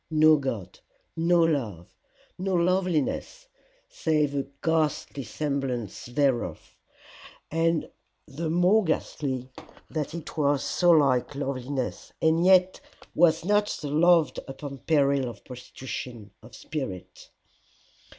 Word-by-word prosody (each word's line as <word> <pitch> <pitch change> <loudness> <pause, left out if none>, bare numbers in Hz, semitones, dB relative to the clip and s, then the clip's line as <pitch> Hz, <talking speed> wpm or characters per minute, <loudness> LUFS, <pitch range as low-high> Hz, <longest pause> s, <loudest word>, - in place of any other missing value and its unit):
No 155 0 +6
God! 125 -9 -5 0.4
no 170 +1 +3
Love! 115 - -2 0.5
no 190 0 -1
loveliness, 180 - 0 0.4
save 155 - 0
a 140 -1 -2 0.2
ghastly 155 -3 0
semblance 130 -5 -3
thereof! 120 - -1 0.8
and 165 0 +1 0.4
the 155 +3 -4
more 180 +6 +4
ghastly 130 -6 -2 0.4
that 155 0 -3
it 170 - -8
was 145 -2 +1
so 175 - +1
like 140 -4 +3
loveliness, 135 -1 -4
and 160 +1 +3
yet 185 0 +4 0.3
was 165 -1 +3
not 205 +1 +3
to 160 - -5
be - - -4
loved 170 0 +4
upon 140 0 -7
peril 140 -3 +2
of 120 - -12
prostitution 125 -3 -8
of - - -14
spirit. 130 - -7
150 Hz, 110 wpm, -26 LUFS, 130-165 Hz, 0.8 s, No